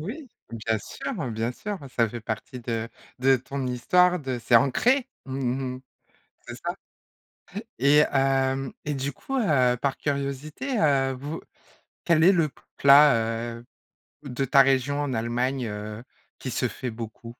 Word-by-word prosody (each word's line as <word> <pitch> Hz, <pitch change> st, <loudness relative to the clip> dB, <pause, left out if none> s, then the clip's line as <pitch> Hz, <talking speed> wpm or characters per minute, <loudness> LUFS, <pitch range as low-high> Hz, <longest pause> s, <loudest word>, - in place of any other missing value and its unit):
Oui, 255 Hz, -, -7 dB, 0.2 s
bien 110 Hz, -1 st, -1 dB
sûr, 260 Hz, -, -6 dB, 0.2 s
bien 115 Hz, +1 st, -2 dB
sûr, 205 Hz, +8 st, -5 dB, 0.2 s
ça 115 Hz, -2 st, +3 dB
fait 120 Hz, +1 st, -7 dB
partie 110 Hz, +4 st, -5 dB
de 115 Hz, -1 st, -3 dB, 0.3 s
de 135 Hz, +1 st, +4 dB
ton 130 Hz, +2 st, -5 dB
histoire 180 Hz, +8 st, +3 dB
de 130 Hz, -3 st, -3 dB
c'est 120 Hz, 0 st, 0 dB
ancré! 245 Hz, -, +2 dB, 0.2 s
Mmh 130 Hz, -1 st, -2 dB
mh. -, -, -12 dB, 0.7 s
C'est -, -, -6 dB
ça -, -, -2 dB, 1.0 s
et 140 Hz, +3 st, +5 dB
hem 135 Hz, -1 st, +1 dB
et 150 Hz, -, -2 dB
du 140 Hz, +1 st, -3 dB
coup, 270 Hz, -, -5 dB
heu, 130 Hz, -, +3 dB
par 140 Hz, -2 st, 0 dB
curiosité, 145 Hz, -, -3 dB
heu, 135 Hz, -3 st, +3 dB
vous 145 Hz, +5 st, -6 dB, 0.7 s
quel 165 Hz, -1 st, +4 dB
est 190 Hz, -, +8 dB
le 165 Hz, -5 st, +2 dB, 0.3 s
plat, 140 Hz, -1 st, +7 dB, 0.4 s
heu, 120 Hz, -, -16 dB, 0.6 s
de 135 Hz, 0 st, -2 dB
ta 135 Hz, +1 st, +5 dB
région 135 Hz, +1 st, +1 dB
en 145 Hz, -3 st, -2 dB
Allemagne, 120 Hz, +3 st, -1 dB
heu, 105 Hz, +1 st, -6 dB, 0.4 s
qui 130 Hz, -, -4 dB
se 125 Hz, -, 0 dB
fait 125 Hz, +1 st, -5 dB
beaucoup? 115 Hz, +1 st, -8 dB
135 Hz, 150 wpm, -25 LUFS, 125-145 Hz, 1.0 s, est